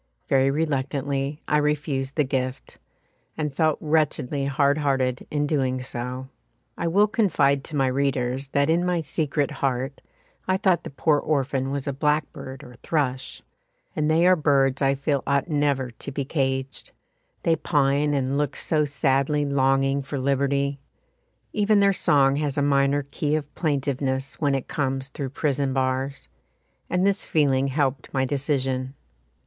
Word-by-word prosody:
Very 135 0 +3
reluctantly 140 -1 -2
I 150 - +3
refused 145 -2 -1
the 150 - +3
gift, 130 -1 -4 0.6
and 150 -3 -2
felt 155 +1 +2
wretchedly 150 -3 0
hard 140 +1 +2
hearted 130 -3 0
in 145 -1 0
doing 130 -4 0
so. 125 +1 -5 0.5
I - - -2
will 200 +5 +4
confide 145 -11 +2
to 155 - -7
my 135 -2 +2
readers 130 0 0
that 140 +1 +1
in 165 +2 +2
my 180 -2 0
secret 150 -2 -1
heart 135 +1 -2 0.5
I 185 0 +2
thought 190 -3 +1
the - - -5
poor 145 +2 +2
orphan 135 -3 -1
was 140 -1 -3
a 140 - -2
blackbird 145 -2 -2
or 125 -1 -13
thrush, 130 -5 -2 0.5
and 155 0 0
they 165 +2 +4
are 185 0 +6
birds 140 -4 +2
I 135 0 +3
feel 140 0 0
ought 140 +4 +1
never 140 -4 0
to 115 - -7
be 140 0 -3
caged; 135 -2 -2 0.5
they 165 - +3
pine 145 -1 +1
and 135 +1 0
look 145 -1 -1
so 155 -2 +1
sadly 145 0 +1
longing 135 0 +2
for 140 +1 -5
liberty; 140 +1 0 0.7
even 210 0 +3
their 200 0 +4
song 140 -5 +3
has 145 -2 -2
a 145 - +2
minor 140 0 +2
key 145 +2 -2
of 145 -2 -4
plaintiveness 135 -3 -2
when 140 -2 +2
it 135 - -3
comes 135 -1 -2
through 135 -1 -5
prison 140 -1 -1
bars, 130 +1 -1 0.6
and 180 +1 +1
this 200 0 +1
feeling 140 -3 +2
helped 135 -2 -1
my 130 -1 +1
decision. 135 -1 -1
140 Hz, 155 wpm, -24 LUFS, 135-150 Hz, 0.7 s, are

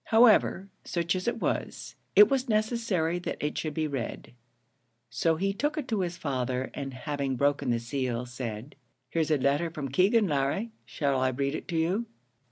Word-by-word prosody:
However, 220 -4 +5 0.2
such 170 0 -1
as 185 +3 -3
it 235 - 0
was, - - -3 0.2
it 420 - +9
was 265 -2 0
necessary 215 -6 +1
that 175 - -4
it 150 - -2
should 155 -2 -3
be 160 - 0
read; 135 -4 -5 0.8
so 160 +8 +2
he 195 +4 0
took 295 +9 -1
it 290 -4 -3
to 220 -3 0
his 175 -2 -2
father, 130 -4 -2
and 135 -1 -5
having 140 0 -2
broken 140 0 +1
the 120 - +2
seal, 120 0 -2
said, 120 0 -6 0.4
"Here's 160 -2 0
a 155 - +3
letter 140 +5 +1
from 150 -4 -5
Keegan, 195 - +4
Larry; 145 +10 0
shall 140 -3 0
I 130 0 +2
read 140 +2 -1
it 165 - -5
you?" 175 +8 0
155 Hz, 175 wpm, -28 LUFS, 135-195 Hz, 0.8 s, it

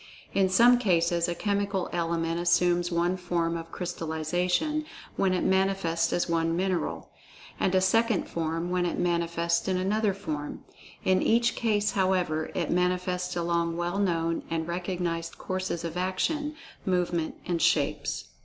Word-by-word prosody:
In 195 -1 +3
some 240 +6 +6
cases 170 -5 +2
a 175 - -2
chemical 200 -1 -1
element 165 -1 -1
assumes 175 0 +2
one 175 +2 +1
form 170 -2 -1
of 165 0 -6
crystallization 180 - -1 0.3
when 190 - +2
it 185 - 0
manifests 190 -3 +1
as 175 - 0
one 165 -1 +1
mineral, 185 -1 -2 0.5
and 190 - +1
a 185 - +4
second 225 +2 +2
form 165 +1 -2
when 180 -1 +1
it - - -2
manifests 170 0 0
in 185 -1 +1
another 200 +2 +1
form—in 185 +2 -3
each 235 +1 +3
case 210 -2 +1
however, 180 -5 +1
it - - -1
manifests 180 0 0
along 170 -1 0
well 175 +3 -1
known 165 -4 0
and 165 0 -2
recognized 175 -1 -3
courses 185 -2 -3
of 165 0 -4
action, 290 - -1 0.3
movement, 175 -3 0
and 170 -2 -1
shapes. - - +1
180 Hz, 140 wpm, -28 LUFS, 170-190 Hz, 0.5 s, some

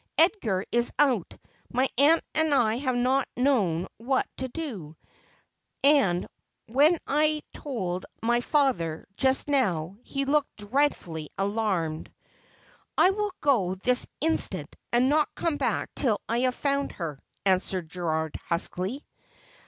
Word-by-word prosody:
Edgar 255 - +2
is 240 0 +3
out. 255 - +2 0.4
My 255 +2 +2
aunt 295 +5 +5
and 315 -2 +2
I 225 -3 +2
have 260 -1 -1
not 255 +2 +2
known 205 -11 +2
what 260 +4 0
to 260 - -2
do, 225 - -6 0.9
and 245 -12 +4 0.4
when 285 +9 +4
I 305 +1 +1
told 185 -11 -4 0.2
my 240 +1 +2
father 245 - 0
just 265 +4 +2
now 195 - 0
he 275 +2 -3
looked 290 +1 +1
dreadfully 205 - -1
alarmed.' 195 -6 -1 0.5
' - - -31 0.3
I 370 - +6
will 415 +1 -2
go 210 -11 +2
this 250 +6 +2
instant, 320 +2 0 0.2
and 245 +2 +3
not 300 +2 +1
come 330 -3 -1
back - - -1
till 225 -7 +1
I 230 +1 0
have 250 - -6
found 280 0 -1
her,' 155 -6 -5 0.3
answered 185 -2 +1
Gerald 160 -2 -2
huskily. 185 - -2
245 Hz, 130 wpm, -27 LUFS, 185-285 Hz, 0.9 s, I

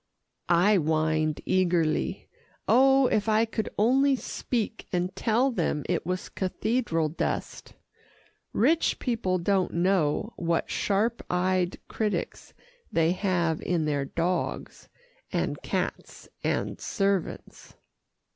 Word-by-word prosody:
I 180 +5 +5
whined 155 -1 0
eagerly. 175 -4 +1 0.4
Oh, 270 +1 +5
if 215 -3 +1
I 220 +1 +4
could 220 -1 -3
only 265 +6 +4
speak, 230 -3 -3
and 180 +1 -1
tell 240 +4 +2
them 150 - -1
it 175 -2 -1
was 185 0 -2
cathedral 190 -3 -1
dust. 155 - -4 0.8
Rich 330 0 +2
people 220 -7 -1
don't 185 +1 0
know 180 +3 +1
what 170 -1 -1
sharp 215 +4 0
eyed 180 0 +1
critics 215 -2 -3 0.4
they 165 0 +3
have 175 -4 0
in 170 -3 0
their 145 -2 0
dogs, 170 +5 -3 0.4
and - - -2
cats - - -4 0.2
and - - -1
servants. 195 -4 -2
185 Hz, 110 wpm, -27 LUFS, 170-220 Hz, 0.8 s, I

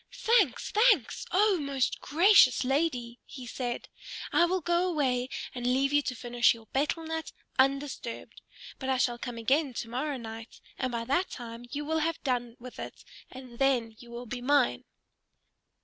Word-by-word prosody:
"Thanks, 465 - +2
thanks, 460 +4 +3
O 395 -1 +3
most 275 -3 -1
gracious 335 - +5
lady!" 255 -3 -1
he 255 -3 -10
said. 240 0 -4 0.5
"I 345 - +5
will 370 +2 0
go 345 +2 +1
away 260 -6 0 0.2
and 245 -1 -3
leave 270 +3 +2
you 290 - +5
to 255 - -4
finish 240 0 +2
your 225 -1 -14
betel 300 +4 0
nut 320 0 -4 0.3
undisturbed. 275 -3 -1 0.4
But 265 - -4
I 260 - +2
shall 240 -1 +1
come 245 -1 -5
again 265 +3 +1
to 230 - -4
morrow 275 +3 -2
night, 225 -1 -9 0.2
and 255 -1 -1
by 230 -1 -3
that 280 +9 +1
time 235 -1 -8
you 295 +2 -4
will 320 +1 0
have 330 +1 -1
done 245 -3 -1
with 250 +1 -10
it, - - -8 0.2
and 255 -2 -11
then 245 -5 +1
you 240 - -13
will 240 +1 -7
be 245 +1 -6
mine!" 255 - +2
260 Hz, 170 wpm, -29 LUFS, 240-305 Hz, 0.5 s, gracious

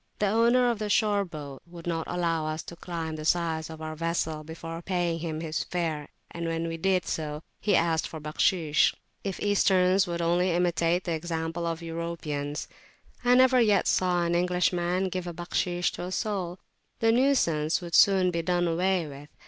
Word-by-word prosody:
The 210 - +1
owner 235 +4 +4
of 230 - -4
the 210 -1 -2
shore 205 -1 +3
boat 145 -7 -8
would 170 -1 -11
not 165 -2 -2
allow 165 -3 -1
us 155 +1 -3
to 170 - -9
climb 165 -2 -5
the 155 - -6
sides 160 -1 0
of 160 0 -8
our 155 0 -5
vessel 160 -1 -2
before 165 +1 -7
paying 175 -2 -1
him 160 -1 -4
his 160 -1 -2
fare, 160 -4 -3 0.2
and 170 0 -4
when 165 0 -1
we 165 - -3
did 185 +1 +1
so, 150 -1 -4 0.2
he 205 -2 +2
asked 165 -2 +2
for 160 - -8
Bakhshish. 155 +1 +2 0.3
If 195 -2 -4
Easterns 190 -2 +3
would 170 -1 -3
only 175 +2 +2
imitate 175 0 +1
the 175 - -3
example 165 +1 -2
of 165 0 -3
Europeans, 165 -3 -4 0.6
I 245 0 +5
never 255 0 +6
yet 210 -4 +3
saw 180 -1 +2
an 170 0 0
Englishman 180 +1 +1
give 185 0 -4
Bakhshish 175 +1 -1
to - - -6
a 180 - -6
soul, 185 -4 -2 0.4
the 225 0 +3
nuisance 200 - +2
would 175 -2 -8
soon 190 -2 +5
be 170 -1 -1
done 175 +1 +1
away 180 +1 +1
with. 145 0 -10
170 Hz, 180 wpm, -27 LUFS, 160-185 Hz, 0.6 s, never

